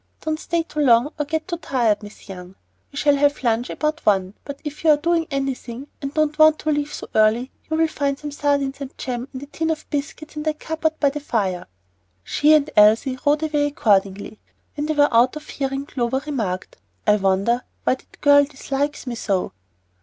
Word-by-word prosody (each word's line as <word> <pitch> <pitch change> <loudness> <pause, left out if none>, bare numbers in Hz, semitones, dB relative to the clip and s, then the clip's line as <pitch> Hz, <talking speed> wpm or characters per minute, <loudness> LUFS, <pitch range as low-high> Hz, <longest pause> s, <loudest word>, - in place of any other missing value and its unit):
Don't 310 0 -2
stay 340 0 -1
too 305 - -7
long 255 +1 +4
or 295 - 0
get 315 +3 -3
too 345 -2 -3
tired, 240 -10 +1
Miss 210 0 -13
Young. 185 -1 -9 0.4
We 280 - -10
shall 290 -1 +3
have 285 0 +2
lunch 235 +1 +1
about 310 +1 -2
one; 195 -2 +2
but 280 -1 -7
if 295 0 -7
you 320 - +4
are 300 - +7
doing 335 +1 +1
anything 270 -2 -4
and 275 -1 -3
don't 305 0 0
want 310 0 +7
to 310 - -1
leave 295 0 -1
so - - -7
early, 220 +4 +3 0.2
you'll 320 +1 +2
find 280 -3 -1
some 295 0 -6
sardines 280 -1 0
and 275 -1 -7
jam 245 0 -4
and 260 +1 -7
a - - -6
tin 320 +3 -3
of 315 -1 -3
biscuits 300 +1 -4
in 300 - -4
that 305 0 -2
cupboard 320 0 -2
by 285 -2 +3
the 295 - -4
fire." 200 - -2 0.6
She 300 - +4
and 300 -1 +3
Elsie 225 +5 +5
rode 295 +2 +3
away 295 -2 +1
accordingly. 200 -6 0 0.4
When 295 0 -2
they 310 - +1
were 290 -3 +4
out 240 +5 +4
of 305 0 -8
hearing, 270 0 -3
Clover 260 -1 -2
remarked, 215 -11 -3 0.3
"I 210 0 +5
wonder 195 +5 +1 0.2
why - - +3
that 260 - -12
girl 285 0 +7
dislikes 280 0 -3
me 250 - -4
so." 200 -5 -1
280 Hz, 205 wpm, -22 LUFS, 235-300 Hz, 0.6 s, are